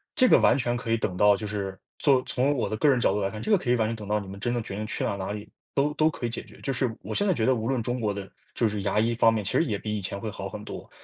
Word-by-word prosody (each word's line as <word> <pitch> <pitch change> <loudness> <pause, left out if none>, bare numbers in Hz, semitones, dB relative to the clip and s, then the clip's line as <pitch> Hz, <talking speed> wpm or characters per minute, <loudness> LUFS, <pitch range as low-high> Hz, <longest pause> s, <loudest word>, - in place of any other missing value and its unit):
这 255 -4 +5
个 - - +7
完 - - +5
全 120 -2 0
可 115 -1 -3
以 115 - +3
等 95 -4 -2
到 105 +1 +5
就 105 - -5
是 100 -2 -4 0.2
做 135 -3 +4
从 135 +3 +1
我 105 - 0
的 - - -2
个 145 +7 +3
人 130 -3 +4
角 100 - +3
度 105 - 0
来 95 - 0
看， 110 - -7
这 - - -4
个 205 - +7
可 125 - -4
以 125 - +5
完 110 -2 +1
全 115 - -2
等 105 -2 -8
到 105 0 +1
你 100 - -8
们 100 +1 -8
真 120 +3 -1
正 120 - 0
决 100 - -6
定 105 +1 -3
去 - - -3
了 100 - -1
哪 95 +1 -4
里 105 0 -6 0.3
都 145 +2 +2
都 155 +1 +3
可 125 - -5
以 120 - 0
解 115 - -4
决。 - - -17
就 135 - -2
是 125 -3 0
我 - - -5
现 205 - +2
在 195 - +3
觉 115 -7 0
得 130 - +4
无 110 0 -3
论 130 -3 +1
中 125 0 -2
国 105 -2 0
的 100 -1 -5 0.3
就 115 - +2
是 105 -1 -2
牙 105 - +1
医 115 +2 +2
方 115 -1 +5
面， 110 -2 -1
其 95 - -2
实 - - +3
也 105 -6 -1
比 105 +1 -3
以 105 - -3
前 100 +1 -4
会 110 - -4
好 95 0 -6
很 105 - -7
多， - - -8
110 Hz, 390 characters per minute, -27 LUFS, 105-125 Hz, 0.3 s, 个